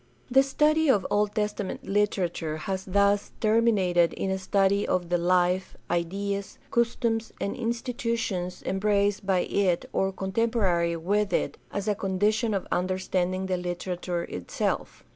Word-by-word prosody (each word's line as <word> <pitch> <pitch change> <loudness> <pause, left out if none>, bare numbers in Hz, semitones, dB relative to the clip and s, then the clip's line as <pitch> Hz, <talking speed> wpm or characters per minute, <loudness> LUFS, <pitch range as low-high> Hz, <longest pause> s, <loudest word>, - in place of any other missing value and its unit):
The 265 +2 +7
study 305 +3 +2
of 205 -8 +3
Old 205 0 +1
Testament 210 -2 -2
Hterature 180 -6 0
has 190 +1 -3
thus 200 +1 +2
termi 230 +2 +4
nated 175 -5 +2
in 190 - -2
a 190 - -1
study 195 +1 +2
of 180 -2 0
the 175 - +2
life, 180 +1 +1
ideas, 195 +3 -2
customs, 230 -1 0
and 200 - -2
institutions 230 -6 -2
embraced 200 0 +1
by 185 -2 +3
it 185 -3 +1
or 190 0 +1
contemporary 190 -4 0
with 205 +5 0
it - - -1
as 200 0 -3
a 210 - +3
condition 205 +3 0
of 195 - -2
understanding 185 0 0
the 185 -1 0
literature 175 0 -3
itself. 90 - -3
195 Hz, 140 wpm, -27 LUFS, 180-210 Hz, -, The